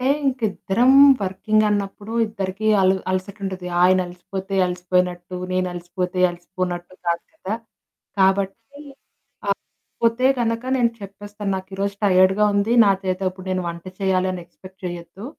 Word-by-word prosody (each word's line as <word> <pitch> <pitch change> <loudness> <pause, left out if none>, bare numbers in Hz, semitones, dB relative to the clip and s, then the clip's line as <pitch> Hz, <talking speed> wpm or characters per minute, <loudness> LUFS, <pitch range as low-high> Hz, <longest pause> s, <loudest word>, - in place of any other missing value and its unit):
అంటే 255 - -1 0.2
ఇంకిద్దరం 245 -1 +2 0.3
వర్కింగ్ 215 +3 +1
అన్నప్పుడు 205 +1 -3
ఇద్దరికీ 200 0 -3
అలు 190 0 +4 0.2
అలసటుంటది. 185 -1 -4 0.2
ఆయన 185 +1 +5
అలిసిపోతే 190 +2 -6
అలసిపోయినట్టు, 180 0 -1 0.2
నేనలసిపోతే 180 0 -2
అలసిపోనట్టు 175 0 -5
కాదు 170 0 0
కదా! 215 -9 -4 0.6
కాబట్టి 195 0 +3 1.2
అలసిపోతే 230 +2 0
గనక 230 0 0
నేను 240 -2 +3
చెప్పేస్తాను 205 +1 -6
నాకిరోజు 195 +1 -4
టైర్డ్‌గా 190 +1 +4
ఉంది. 200 +3 +1
నాచేత 190 -2 +1
ఇప్పుడు 185 0 -12
నేను 185 -1 -1
వంట 170 0 -7 0.2
చేయాలి 190 -1 +1
అని 180 -1 -6
ఎక్స్‌పెక్ట్ 185 +2 -16
చేయొద్దు. 175 +3 -7
190 Hz, 115 wpm, -22 LUFS, 180-205 Hz, 1.2 s, ఆయన